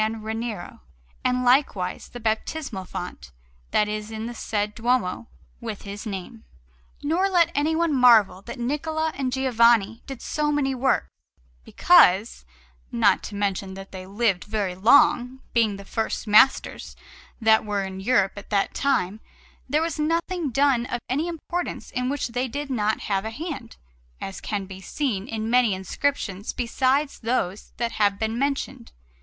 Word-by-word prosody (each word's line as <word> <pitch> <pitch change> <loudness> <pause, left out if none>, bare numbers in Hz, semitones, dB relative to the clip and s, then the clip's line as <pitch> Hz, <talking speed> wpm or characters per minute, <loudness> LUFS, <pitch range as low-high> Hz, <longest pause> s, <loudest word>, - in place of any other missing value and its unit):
Ranieri, 220 -2 -4 0.4
and 250 0 +1
likewise 245 -8 +2
the 245 - -9
baptismal 220 -1 -2
font 175 - -7 0.4
that 210 - +2
is 210 0 -4
in 220 0 -5
the 240 - -5
said 210 -2 -2
Duomo, 230 - 0 0.3
with 205 - -6
his 205 +2 -7
name. 185 - -6 0.6
Nor 345 +7 +1
let 340 -3 +3
anyone 320 +2 +1
marvel 230 -8 +5
that 235 +5 -8
Niccola 315 +5 -1
and 265 -2 -2
Giovanni 235 -4 +3
did 270 -3 -7
so 300 -1 -1
many 280 -2 +1
works, 265 +1 +1 0.6
because, 205 - +4 0.5
not - - +3
to 205 - -7
mention 195 -1 -2
that 195 0 -10
they 185 -1 -8
lived 200 -2 0
very 205 -3 -2
long, 245 +5 +4 0.2
being 220 -4 +2
the 200 - -11
first 225 +2 -2
masters 220 +5 +3 0.4
that 220 -1 +4
were 205 -2 -1
in 190 0 -6
Europe 195 -2 +2
at 200 - -9
that 200 -2 +1
time, 215 -7 0 0.5
there 300 +4 +2
was 330 -1 -3
nothing 335 +1 0
done 260 -1 +2
of 245 - -3
any 290 +7 0
importance 345 +1 -4
in 250 0 -1
which 285 -3 -2
they 250 +2 -1
did 285 +3 -5
not 215 -3 0
have 195 -2 -1
a 220 - -3
hand, 270 -1 -7 0.4
as 195 - -6
can 200 -2 -3
be 190 0 -10
seen 215 -4 -2
in 220 -1 -3
many 240 -4 +3
inscriptions 200 0 -2
besides 260 +4 0
those 220 -5 -2
that 235 -1 -1
have 205 -3 +2
been 220 +2 -2
mentioned. 275 - -2
230 Hz, 155 wpm, -24 LUFS, 205-270 Hz, 0.6 s, marvel